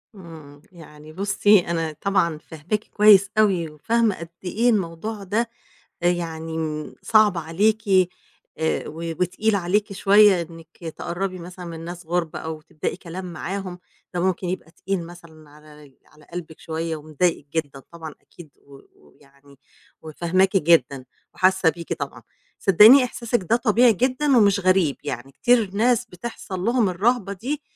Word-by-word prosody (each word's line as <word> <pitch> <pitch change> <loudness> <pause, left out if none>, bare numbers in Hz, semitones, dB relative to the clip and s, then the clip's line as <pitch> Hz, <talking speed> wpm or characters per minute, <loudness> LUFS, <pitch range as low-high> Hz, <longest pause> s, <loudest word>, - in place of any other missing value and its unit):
إمم، 160 -6 -13
يعني 155 -3 -14
بُصي 205 +2 +3
أنا 165 -3 -3
طبعًا 180 -5 +1
فاهماكِ 165 +7 -5
كويس 205 -2 +5
أوي، 190 -7 +2
وفاهمة 220 +8 0
قد 170 0 -8
إيه 220 +7 +1
الموضوع 200 +1 -2
ده 220 +5 -1 0.5
يعني، 165 -2 -2
امم 155 -1 -4
صعب 215 -4 +4
عليكِ، 195 +7 +1 0.8
آآ، 160 0 -1
و 150 - -9 0.3
وتقيل 205 +4 +1
عليكِ 200 +2 0
شوية 200 -1 +5
إنِك 165 -1 -12 0.2
تقرّبي 185 +2 -4
مثلًا 180 +1 -10
من 165 -1 -7
ناس 175 0 -8
غُرب 170 -1 -2
أو 160 -1 -6
تبدئي 155 0 -5
كلام 180 0 -8
معاهم، 185 0 -5 0.3
ده 175 - -2
ممكن 185 0 -1
يبقى 175 -2 -5
تقيل 185 0 -4
مثلًا 165 -3 -15
على 150 -2 -17
على 150 -1 -21
قلبِك 165 -3 -7
شوية 165 0 -4
ومضايقِك 155 +1 -1
جدًا 145 -4 -3
طبعًا 160 -2 -9
أكيد، 170 -3 -15
و 140 - -18
و 135 - -15
ويعني 140 -1 -23 0.4
وفاهماكِ 175 +5 +1
جدًا 145 -6 +2 0.3
وحاسة 185 -2 +3
بيكِ 170 +1 -5
طبعًا، - - -7 0.4
صدقيني 215 +8 +7
إحساسِك 240 -3 -2
ده 230 - +5
طبيعي 235 0 +4
جدًا 255 +5 +1
ومش 200 -3 +4
غريب، 185 -6 +2
يعني 120 +3 -6
كتير 230 - +2
ناس 240 +3 +2
بتحصَل 195 -2 -7
لهم 230 +2 +1
الرهبة 200 +2 0
دي 270 +10 -4
180 Hz, 145 wpm, -23 LUFS, 160-205 Hz, 0.8 s, صدقيني